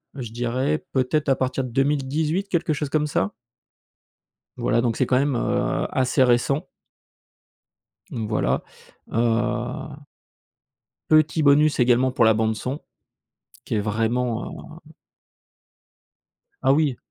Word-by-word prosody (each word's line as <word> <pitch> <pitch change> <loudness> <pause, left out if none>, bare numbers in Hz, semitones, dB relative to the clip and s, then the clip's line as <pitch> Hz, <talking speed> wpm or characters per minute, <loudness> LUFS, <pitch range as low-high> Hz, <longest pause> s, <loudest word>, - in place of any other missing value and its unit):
je 120 -5 -6
dirais 125 +6 -1
peut-être 140 +3 0
à 135 - +4
partir 130 +1 -1
de 125 - -5
2018, 150 - 0
quelque 170 -4 0
chose 150 -1 -3
comme 150 0 0
ça. 100 -9 -1 1.2
Voilà 115 - +1
donc 115 -2 -1
c'est - - +2
quand 125 - +2
même, 140 -1 0
heu, - - 0
assez 130 0 +2
récent. 130 +6 +2 1.5
Voilà, 110 -2 -1 0.5
heu. 115 +1 -1 1.1
Petit 155 0 +4
bonus 145 +1 +4
également 125 +1 +3
pour 125 -2 +2
la 110 -1 +5
bande 110 0 0
son, 130 +6 -5 0.8
qui - - -4
est 105 - +1
vraiment, 115 +7 -2
heu - - -15 1.7
Ah - - +4
oui 145 -4 +1
130 Hz, 120 wpm, -23 LUFS, 120-150 Hz, 1.7 s, la